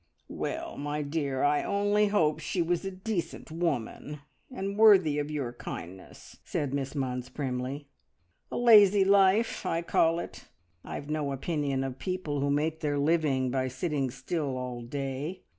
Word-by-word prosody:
"Well, -, -, -4 dB
my 145 Hz, +1 st, -2 dB
dear, 140 Hz, -3 st, -2 dB
I 145 Hz, 0 st, +3 dB
only 205 Hz, +1 st, +2 dB
hope 160 Hz, -7 st, +2 dB
she 160 Hz, +4 st, -3 dB
was 175 Hz, +1 st, +1 dB
a 195 Hz, -, -2 dB
decent 190 Hz, -3 st, -4 dB
woman, 150 Hz, -2 st, -3 dB, 0.3 s
and 200 Hz, -6 st, -4 dB
worthy 190 Hz, -9 st, +6 dB
of 145 Hz, 0 st, -3 dB
your 140 Hz, -6 st, -3 dB
kindness," 90 Hz, -5 st, -9 dB
said 140 Hz, -2 st, -2 dB
Miss 135 Hz, 0 st, -3 dB
Munns 125 Hz, -2 st, -3 dB
primly. 130 Hz, +1 st, -3 dB, 0.7 s
"A -, -, -3 dB
lazy 205 Hz, -5 st, +7 dB
life, 200 Hz, +3 st, +4 dB
I 165 Hz, +1 st, -1 dB
call 165 Hz, 0 st, +2 dB
it. 170 Hz, -, -7 dB, 0.4 s
I've 145 Hz, +1 st, -6 dB
no 150 Hz, -2 st, -1 dB
opinion 140 Hz, -1 st, -1 dB
of 135 Hz, -1 st, -5 dB
people 170 Hz, -3 st, -3 dB
who 140 Hz, +1 st, 0 dB
make 155 Hz, +3 st, 0 dB
their 145 Hz, -3 st, -1 dB
living 140 Hz, -4 st, +1 dB
by 130 Hz, 0 st, 0 dB
sitting 135 Hz, +1 st, -2 dB
still 135 Hz, +1 st, -3 dB
all 125 Hz, -1 st, -5 dB
day. 135 Hz, +6 st, -4 dB
150 Hz, 155 wpm, -29 LUFS, 135-175 Hz, 0.7 s, lazy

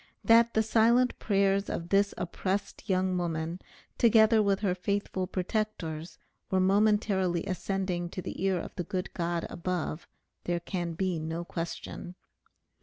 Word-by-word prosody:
That 230 Hz, 0 st, +5 dB
the 220 Hz, -, +4 dB
silent 235 Hz, +3 st, +3 dB
prayers 200 Hz, -1 st, +2 dB
of 170 Hz, +1 st, -4 dB
this 200 Hz, 0 st, +3 dB
oppressed 190 Hz, +4 st, -3 dB
young 185 Hz, 0 st, +2 dB
woman, 165 Hz, 0 st, -3 dB, 0.4 s
together 220 Hz, -1 st, +6 dB
with 200 Hz, -1 st, +1 dB
her 195 Hz, -4 st, +2 dB
faithful 190 Hz, 0 st, -2 dB
protector's, 180 Hz, -5 st, -3 dB, 0.3 s
were 190 Hz, -, +2 dB
momentarily 195 Hz, -2 st, +2 dB
ascending 185 Hz, -2 st, -2 dB
to 185 Hz, -, -5 dB
the -, -, -5 dB
ear 190 Hz, -1 st, +2 dB
of -, -, -7 dB
the 180 Hz, -, -1 dB
good 185 Hz, +2 st, -4 dB
God 170 Hz, -1 st, -1 dB
above, 175 Hz, -2 st, -3 dB, 0.4 s
there 175 Hz, 0 st, 0 dB
can 175 Hz, -1 st, -3 dB
be 180 Hz, -1 st, -1 dB
no 165 Hz, +2 st, -4 dB
question. 170 Hz, +1 st, -6 dB
185 Hz, 140 wpm, -29 LUFS, 175-205 Hz, 0.4 s, together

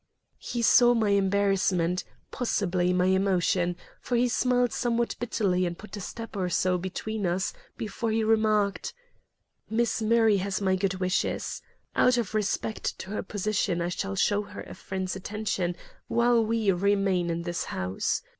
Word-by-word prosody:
He 240 Hz, -1 st, -3 dB
saw 240 Hz, +1 st, +6 dB
my 220 Hz, -3 st, +2 dB
embarrassment, 195 Hz, -3 st, +2 dB, 0.3 s
possibly 180 Hz, -7 st, 0 dB
my 180 Hz, 0 st, +2 dB
emotion, 185 Hz, -2 st, +2 dB, 0.3 s
for 245 Hz, -, -2 dB
he 245 Hz, +1 st, +3 dB
smiled 245 Hz, 0 st, +1 dB
somewhat 235 Hz, -1 st, 0 dB
bitterly 195 Hz, -6 st, 0 dB
and 170 Hz, 0 st, -5 dB
put 215 Hz, -, -10 dB
a 205 Hz, -, -6 dB
step 230 Hz, +4 st, -7 dB
or 185 Hz, -2 st, -1 dB
so 180 Hz, +1 st, +1 dB
between 200 Hz, +3 st, -3 dB
us 180 Hz, +2 st, -1 dB, 0.2 s
before 225 Hz, +1 st, -3 dB
he 220 Hz, 0 st, +1 dB
remarked: 215 Hz, -2 st, +1 dB, 0.7 s
"Miss 230 Hz, +1 st, 0 dB
Murray 220 Hz, -1 st, +4 dB
has 195 Hz, 0 st, -2 dB
my 190 Hz, -2 st, +2 dB
good 190 Hz, 0 st, 0 dB
wishes. 185 Hz, 0 st, -1 dB, 0.3 s
Out 250 Hz, 0 st, +4 dB
of 230 Hz, -5 st, -2 dB
respect 215 Hz, +1 st, -1 dB
to 190 Hz, -, -8 dB
her 210 Hz, -, -2 dB
position 205 Hz, -2 st, -1 dB
I 170 Hz, 0 st, -1 dB
shall 195 Hz, +2 st, -3 dB
show 205 Hz, +1 st, +2 dB
her 205 Hz, -, -9 dB
a -, -, -10 dB
friend's 190 Hz, -1 st, -4 dB
attention 190 Hz, -2 st, -2 dB, 0.3 s
while 235 Hz, 0 st, +3 dB
we 220 Hz, -2 st, +1 dB
remain 190 Hz, -1 st, +1 dB
in 170 Hz, 0 st, -2 dB
this 175 Hz, -1 st, -3 dB
house. 90 Hz, +1 st, -2 dB
200 Hz, 155 wpm, -27 LUFS, 185-220 Hz, 0.7 s, saw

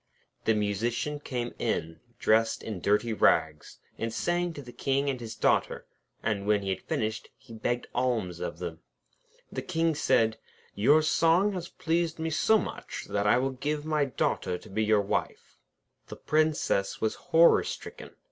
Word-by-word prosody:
The 110 Hz, -, +3 dB
Musician 115 Hz, +8 st, -1 dB
came 125 Hz, -4 st, -4 dB
in, 80 Hz, +1 st, -2 dB, 0.2 s
dressed 110 Hz, 0 st, +2 dB
in 110 Hz, -4 st, -5 dB
dirty 105 Hz, +4 st, +2 dB
rags, 75 Hz, -7 st, +1 dB, 0.2 s
and 115 Hz, 0 st, -2 dB
sang 175 Hz, +7 st, 0 dB
to 145 Hz, -, -8 dB
the 125 Hz, -, -11 dB
King 140 Hz, +2 st, 0 dB
and 130 Hz, -, -5 dB
his 115 Hz, -2 st, -7 dB
Daughter, -, -, +1 dB, 0.4 s
and 100 Hz, -2 st, -1 dB
when 105 Hz, -1 st, +2 dB
he 95 Hz, -, -3 dB
had 95 Hz, -, -3 dB
finished, 110 Hz, +1 st, -3 dB
he 130 Hz, -3 st, -14 dB
begged 120 Hz, +2 st, -2 dB
alms 115 Hz, -9 st, -1 dB
of 90 Hz, -, -4 dB
them. 85 Hz, -2 st, -6 dB, 0.7 s
The -, -, -3 dB
King 165 Hz, 0 st, 0 dB
said: 115 Hz, -6 st, +2 dB, 0.3 s
'Your 145 Hz, +10 st, +4 dB
song 170 Hz, +6 st, +3 dB
has 180 Hz, -2 st, -5 dB
pleased 170 Hz, -2 st, -1 dB
me 160 Hz, 0 st, -2 dB
so 220 Hz, +8 st, +4 dB
much, -, -, -5 dB
that 100 Hz, 0 st, 0 dB
I 105 Hz, -, +5 dB
will 135 Hz, +2 st, 0 dB
give 145 Hz, +3 st, -3 dB
you 155 Hz, -, -6 dB
my 150 Hz, -2 st, +3 dB
Daughter 90 Hz, -8 st, -1 dB
to -, -, -15 dB
be 110 Hz, +3 st, 0 dB
your 105 Hz, -1 st, +3 dB
wife.' 100 Hz, -, -3 dB, 0.5 s
The -, -, -8 dB
Princess 155 Hz, -10 st, 0 dB
was 110 Hz, -, 0 dB, 0.2 s
horror 165 Hz, +1 st, +6 dB
stricken. -, -, -8 dB
120 Hz, 170 wpm, -28 LUFS, 105-155 Hz, 0.7 s, horror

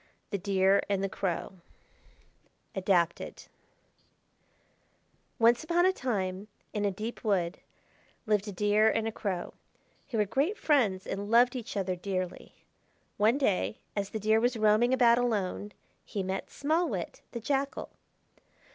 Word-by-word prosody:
THE 200 Hz, -, -1 dB
DEER 195 Hz, 0 st, +3 dB
AND 195 Hz, -1 st, 0 dB
THE 195 Hz, -, 0 dB
CROW 190 Hz, -1 st, -3 dB, 1.1 s
(Adapted) 180 Hz, -3 st, 0 dB, 1.9 s
Once 235 Hz, +2 st, +4 dB
upon 345 Hz, +2 st, +2 dB
a 375 Hz, -, +4 dB
time 200 Hz, -, -2 dB, 0.3 s
in 210 Hz, -1 st, -1 dB
a -, -, +3 dB
deep 215 Hz, +5 st, -6 dB
wood 185 Hz, -5 st, 0 dB, 0.7 s
lived 210 Hz, -2 st, +1 dB
a -, -, -3 dB
Deer 210 Hz, +3 st, +3 dB
and 225 Hz, 0 st, 0 dB
a -, -, -1 dB
Crow, 190 Hz, -5 st, -4 dB, 0.6 s
who 240 Hz, -, -2 dB
were 210 Hz, -, +3 dB
great 290 Hz, -, 0 dB
friends 220 Hz, -11 st, +2 dB
and 200 Hz, +1 st, -4 dB
loved 240 Hz, +3 st, +5 dB
each 235 Hz, -4 st, -5 dB
other 190 Hz, -2 st, -1 dB
dearly. 185 Hz, 0 st, -4 dB, 0.6 s
One 220 Hz, +5 st, +4 dB
day, 185 Hz, -, 0 dB, 0.2 s
as 200 Hz, -1 st, -2 dB
the 220 Hz, -, -4 dB
Deer 215 Hz, +1 st, +3 dB
was 240 Hz, +1 st, +1 dB
roaming 215 Hz, +3 st, +4 dB
about 240 Hz, -2 st, +5 dB
alone, 210 Hz, -4 st, -1 dB, 0.3 s
he 200 Hz, -, -4 dB
met 190 Hz, +1 st, -3 dB
Small 320 Hz, +4 st, 0 dB
Wit, -, -, -5 dB
the 235 Hz, -, -3 dB
Jackal. 275 Hz, +4 st, -2 dB
210 Hz, 140 wpm, -30 LUFS, 195-240 Hz, 1.9 s, loved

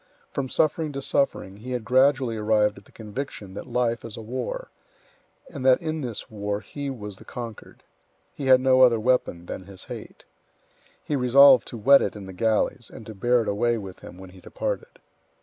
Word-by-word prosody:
From 135 Hz, -2 st, -3 dB
suffering 155 Hz, +1 st, +1 dB
to 140 Hz, -, -4 dB
suffering, 100 Hz, -10 st, -1 dB
he 125 Hz, +4 st, -6 dB
had 120 Hz, -3 st, -3 dB
gradually 130 Hz, -2 st, +3 dB
arrived 105 Hz, -1 st, +1 dB
at 100 Hz, -, -23 dB
the -, -, -21 dB
conviction 110 Hz, -3 st, -7 dB
that -, -, -8 dB
life 120 Hz, -1 st, 0 dB
is 115 Hz, -2 st, -8 dB
a -, -, -6 dB
war; -, -, -5 dB, 0.8 s
and 140 Hz, -4 st, -8 dB
that 130 Hz, -1 st, +5 dB
in 160 Hz, -2 st, -3 dB
this 120 Hz, -5 st, -5 dB
war 105 Hz, -1 st, -4 dB
he 145 Hz, +3 st, -6 dB
was 105 Hz, -7 st, -7 dB
the -, -, -14 dB
conquered. 115 Hz, -3 st, -9 dB, 0.5 s
He 140 Hz, -, -5 dB
had 130 Hz, -1 st, +7 dB
no 130 Hz, 0 st, +4 dB
other 120 Hz, -3 st, +6 dB
weapon 110 Hz, -7 st, 0 dB
than 95 Hz, -, -7 dB
his 95 Hz, -2 st, -9 dB
hate. -, -, -10 dB, 0.8 s
He 150 Hz, -, -2 dB
resolved 130 Hz, 0 st, +6 dB
to 120 Hz, -, -7 dB
whet 135 Hz, +6 st, +6 dB
it -, -, -2 dB
in 100 Hz, -2 st, -8 dB
the 95 Hz, -, -9 dB
galleys 110 Hz, +3 st, 0 dB
and 110 Hz, -, -11 dB
to 110 Hz, -, -8 dB
bear 120 Hz, +4 st, +2 dB
it -, -, -8 dB
away 120 Hz, +3 st, +1 dB
with 95 Hz, -4 st, -8 dB
him -, -, -12 dB
when 95 Hz, 0 st, -11 dB
he 95 Hz, 0 st, -16 dB
departed. -, -, -5 dB
120 Hz, 200 wpm, -25 LUFS, 105-135 Hz, 0.8 s, had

